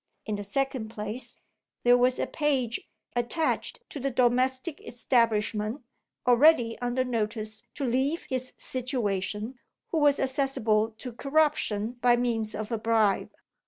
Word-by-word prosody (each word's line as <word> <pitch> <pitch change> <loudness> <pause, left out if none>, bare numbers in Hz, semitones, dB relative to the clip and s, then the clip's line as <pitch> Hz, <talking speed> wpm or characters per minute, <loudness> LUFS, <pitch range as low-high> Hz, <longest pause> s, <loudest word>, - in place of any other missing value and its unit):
In 215 - -2
the 205 - -5
second 255 +1 -2
place, 220 +2 -6 0.5
there 245 0 +7
was 250 +1 +3
a - - 0
page 265 -6 -1 0.3
attached 310 - -1
to 290 - -5
the 275 +1 -1
domestic 255 +4 +1
establishment 225 -1 0 0.4
(already 245 -1 +5
under 245 +1 0
notice 220 -2 -3
to 285 - -2
leave 265 +6 0
his 255 -1 -3
situation), 225 -2 -2 0.3
who 325 - 0
was 290 -1 +4
accessible 260 -5 +1
to 250 +1 -7
corruption 265 -6 +1
by 245 0 +5
means 230 -3 -1
of 215 +2 -5
a 230 - -1
bribe. 220 -3 +2
245 Hz, 130 wpm, -28 LUFS, 220-265 Hz, 0.5 s, there